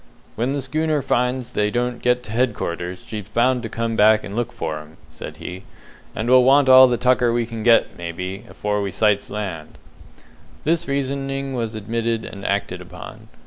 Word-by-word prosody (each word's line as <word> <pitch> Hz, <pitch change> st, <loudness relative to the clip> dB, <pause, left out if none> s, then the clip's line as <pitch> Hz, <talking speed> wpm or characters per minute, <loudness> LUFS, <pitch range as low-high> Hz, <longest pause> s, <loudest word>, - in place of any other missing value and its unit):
"When 120 Hz, +5 st, -1 dB
the 140 Hz, -2 st, -2 dB
schooner 155 Hz, +3 st, 0 dB
finds 125 Hz, 0 st, 0 dB
they 105 Hz, -3 st, +1 dB
don't 120 Hz, +2 st, -2 dB
get 125 Hz, 0 st, +2 dB
to 110 Hz, -, -9 dB
headquarters, 95 Hz, -7 st, -2 dB
she's 105 Hz, -2 st, -7 dB
bound 125 Hz, +2 st, +2 dB
to 115 Hz, -, -5 dB
come 115 Hz, 0 st, -2 dB
back 110 Hz, 0 st, +5 dB
and 100 Hz, -, -7 dB
look 120 Hz, +1 st, -1 dB
for 75 Hz, -8 st, -4 dB
'em," 75 Hz, +1 st, -14 dB
said -, -, -9 dB
he; 90 Hz, +1 st, -7 dB, 0.5 s
"and 110 Hz, -, -3 dB
we'll 130 Hz, 0 st, +6 dB
want 135 Hz, +2 st, +5 dB
all 130 Hz, 0 st, +9 dB
the 120 Hz, -1 st, 0 dB
tucker 125 Hz, -1 st, +3 dB
we 120 Hz, 0 st, 0 dB
can 115 Hz, -1 st, -7 dB
get, 115 Hz, +1 st, +4 dB
maybe, 90 Hz, +3 st, -5 dB
afore 105 Hz, 0 st, -2 dB
we 100 Hz, -, -2 dB
sights 100 Hz, +1 st, +1 dB
land." 95 Hz, -7 st, -6 dB, 0.9 s
This 165 Hz, +2 st, 0 dB
reasoning 135 Hz, 0 st, -2 dB
was 115 Hz, -3 st, -3 dB
admitted 115 Hz, +1 st, -2 dB
and 100 Hz, -, -9 dB
acted 95 Hz, -2 st, -1 dB
upon. 90 Hz, 0 st, -11 dB
115 Hz, 185 wpm, -21 LUFS, 100-125 Hz, 0.9 s, all